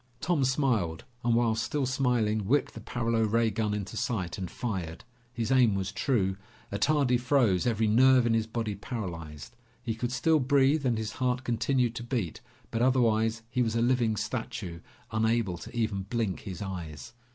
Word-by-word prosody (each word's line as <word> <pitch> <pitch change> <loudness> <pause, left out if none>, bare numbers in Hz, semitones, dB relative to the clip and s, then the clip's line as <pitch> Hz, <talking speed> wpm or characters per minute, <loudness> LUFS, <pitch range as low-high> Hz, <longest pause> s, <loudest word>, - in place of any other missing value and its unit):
Tom 155 -1 +1
smiled, 125 - +1 0.2
and 120 -1 +2
while 115 -1 +3
still 120 +6 -1
smiling, 120 -6 +1
whipped 140 +6 +2
the - - -8
paralo 115 0 -1
ray 115 +1 +2
gun 110 0 -1
into 105 +1 -4
sight 110 -6 -2
and 90 -2 -4
fired. 95 -9 -4 0.3
His 120 0 -3
aim 125 -6 +5
was 95 0 -2
true. 100 -5 0 0.3
Attardi 125 +4 +2
froze, 120 -7 +2
every 115 -2 +1
nerve 125 +3 +5
in 115 - +2
his 110 -1 +1
body 115 -2 -2
paralyzed. 85 - -6 0.3
He 115 -2 -1
could 120 +2 -3
still 155 +5 +3
breathe 140 +1 +3
and 120 -2 +1
his 110 0 -3
heart 125 +1 -1
continued 120 0 +1
to 120 - -5
beat, 115 - -3 0.3
but 115 - -1
otherwise, 115 -3 +2
he 125 +1 -1
was 115 -2 0
a 115 - +2
living 120 -3 +2
statue, 110 -5 -4 0.3
unable 110 -4 +1
to 120 - -9
even 110 -4 0
blink 115 -6 -1
his 95 -2 -6
eyes. 90 +1 -7
115 Hz, 175 wpm, -29 LUFS, 105-125 Hz, 0.3 s, aim